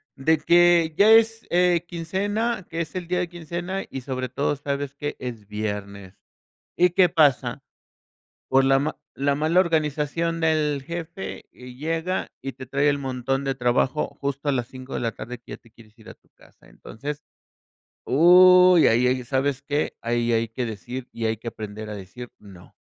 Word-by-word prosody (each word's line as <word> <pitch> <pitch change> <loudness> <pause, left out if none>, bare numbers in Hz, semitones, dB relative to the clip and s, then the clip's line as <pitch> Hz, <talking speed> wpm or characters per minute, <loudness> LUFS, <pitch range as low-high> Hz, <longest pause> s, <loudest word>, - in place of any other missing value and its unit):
De 155 +4 +2
que 170 -1 +4
ya 205 +4 +5
es, 225 0 +4
eh, 175 -1 +2
quincena, 195 +5 -2
que 165 +1 -3
es 160 - -6
el 180 -2 -4
día 180 0 -1
de 180 - -1
quincena 175 +3 -5
y 135 - -6
sobre 130 -1 -4
todo, 140 +3 -1
sabes 140 0 -4
que, 145 +1 -5
es 115 -5 -7
viernes 100 -2 -5 0.6
¿Y 180 0 +4
qué 180 0 +4
pasa? 155 -6 +2 0.9
Por 135 0 +4
la 135 0 +4
ma 150 +3 -2 0.2
la 140 +1 0
mala 160 +5 +2
organización 165 0 -1
del 150 -3 +1
jefe, 170 +3 -7
y 125 0 -12
llega, 165 +5 -2
y 135 - -4
te 130 +1 -10
trae 145 +1 +1
el 145 - +2
montón 135 0 -2
de 135 -1 -1
trabajo 125 +3 +1
justo 140 +1 -3
a - - +3
las 125 -2 -2
5 130 0 -10
de - - -2
la 115 -2 -1
tarde 125 +2 -8
que 120 - -13
ya - - -6
te 115 - -23
quieres 115 0 -20
ir 110 - -16
a - - -10
tu - - -37
casa. - - -23
Entonces, 145 +6 -8 0.8
¿uy, 180 +3 +7
y - - +7
ahí, 125 +2 +2
sabes 135 +1 -1
qué? 145 +1 -2
Ahí 120 0 0
hay 115 0 +1
que 120 +2 -4
decir, 120 +4 -7
y 115 -1 -3
hay 110 0 0
que 120 - -15
aprender 110 -1 -7
a - - -5
decir 120 +6 -10
no. 95 -4 -15
140 Hz, 185 wpm, -24 LUFS, 125-170 Hz, 0.9 s, uy